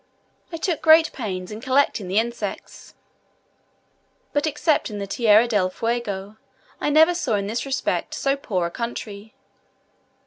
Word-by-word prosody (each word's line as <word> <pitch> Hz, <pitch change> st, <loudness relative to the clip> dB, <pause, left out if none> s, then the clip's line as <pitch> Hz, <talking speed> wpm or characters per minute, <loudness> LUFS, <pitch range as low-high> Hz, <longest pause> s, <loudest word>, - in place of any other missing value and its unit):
I 330 Hz, -, -4 dB
took 330 Hz, 0 st, -2 dB
great 320 Hz, 0 st, +6 dB
pains 185 Hz, -7 st, -5 dB
in 215 Hz, +1 st, -7 dB
collecting 260 Hz, -6 st, +1 dB
the 190 Hz, +3 st, -1 dB
insects, 235 Hz, +2 st, -4 dB, 1.4 s
but 290 Hz, +2 st, +1 dB
excepting 290 Hz, -, 0 dB
Tierra 220 Hz, +2 st, +4 dB
del 205 Hz, -5 st, +1 dB
Fuego, 215 Hz, -2 st, -3 dB, 0.4 s
I -, -, 0 dB
never 315 Hz, +4 st, +5 dB
saw 295 Hz, -10 st, -1 dB
in 200 Hz, -1 st, -1 dB
this 230 Hz, +6 st, -3 dB
respect 265 Hz, -1 st, -2 dB
so 275 Hz, 0 st, 0 dB
poor 195 Hz, -10 st, -2 dB
a 170 Hz, -, -4 dB
country. 220 Hz, 0 st, -6 dB
235 Hz, 135 wpm, -23 LUFS, 205-285 Hz, 1.4 s, great